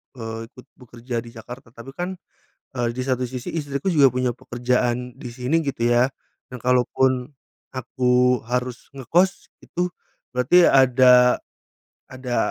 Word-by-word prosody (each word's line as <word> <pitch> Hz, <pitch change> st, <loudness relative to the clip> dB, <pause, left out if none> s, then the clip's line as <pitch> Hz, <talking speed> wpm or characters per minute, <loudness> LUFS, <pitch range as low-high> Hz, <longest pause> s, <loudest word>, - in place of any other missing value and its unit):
eee, 115 Hz, -1 st, -6 dB
ikut 125 Hz, -, -15 dB
bekerja 120 Hz, 0 st, -7 dB
di 115 Hz, -, -11 dB
Jakarta 120 Hz, +2 st, -11 dB
tapi 115 Hz, +3 st, -10 dB
kan, 180 Hz, +1 st, -3 dB, 0.6 s
eee, 120 Hz, -2 st, 0 dB
di 130 Hz, -, -4 dB
satu 130 Hz, -1 st, -1 dB
sisi 125 Hz, 0 st, -6 dB
istriku 145 Hz, 0 st, -3 dB
juga 140 Hz, -5 st, +5 dB
punya 125 Hz, 0 st, 0 dB
pekerjaan 125 Hz, 0 st, -1 dB
di 125 Hz, -, -8 dB
sini 135 Hz, +7 st, 0 dB
gitu 125 Hz, -5 st, -1 dB
ya, 120 Hz, +1 st, +4 dB, 0.5 s
nah 125 Hz, -, -6 dB
kalaupun 125 Hz, +1 st, +1 dB, 0.4 s
aku 125 Hz, -1 st, +1 dB
harus 125 Hz, 0 st, -4 dB
ngekos 170 Hz, +8 st, 0 dB, 0.2 s
itu 180 Hz, +1 st, -2 dB, 0.5 s
berarti 170 Hz, +8 st, +5 dB
ada, 125 Hz, -1 st, +5 dB, 0.7 s
ada 130 Hz, -2 st, -4 dB
125 Hz, 135 wpm, -22 LUFS, 125-130 Hz, 0.7 s, juga